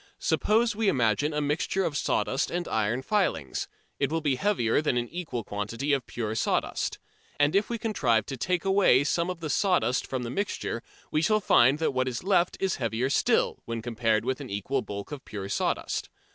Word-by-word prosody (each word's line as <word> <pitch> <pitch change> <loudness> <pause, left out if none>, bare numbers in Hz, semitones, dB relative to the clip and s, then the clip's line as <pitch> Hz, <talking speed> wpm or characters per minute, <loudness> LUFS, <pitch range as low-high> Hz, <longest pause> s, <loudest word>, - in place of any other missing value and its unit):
Suppose 225 +1 +2
we 220 -1 +2
imagine 125 - +2
a 150 0 -1
mixture 150 +6 0
of 150 - -2
sawdust 125 -1 0
and 175 0 -3
iron 110 +4 0
filings: 180 - 0 0.3
it - - +1
will 165 - +1
be 150 -3 +1
heavier 145 - +1
than 145 -5 0
an 120 0 -1
equal 160 -9 -4
quantity 115 +8 -2
of 135 -3 -1
pure 110 -2 -3
sawdust. 110 - -1 0.4
And 145 +3 +3
if 200 +2 +2
we 235 - -1
contrive 125 - +1
to 135 - -5
take 180 +8 -1
away 190 -9 +5
some 170 +4 0
of 180 -2 -5
the 155 - -3
sawdust 180 -10 +1
from 130 -2 -3
the 120 - -4
mixture 195 - -2 0.3
we 155 - +2
shall 215 +6 +3
find 135 - +5
that 160 -3 0
what 130 0 0
is 125 +2 -3
left 180 -2 +2
is 190 -2 0
heavier 120 +2 -1
still, - - +2
when 115 -1 -4
compared 115 -2 0
with 130 +2 -1
an 135 - -7
equal 105 +7 -1
bulk 100 +1 -7
of 145 -3 -6
pure 100 -2 -6
sawdust. - - -1
135 Hz, 200 wpm, -27 LUFS, 115-175 Hz, 0.4 s, away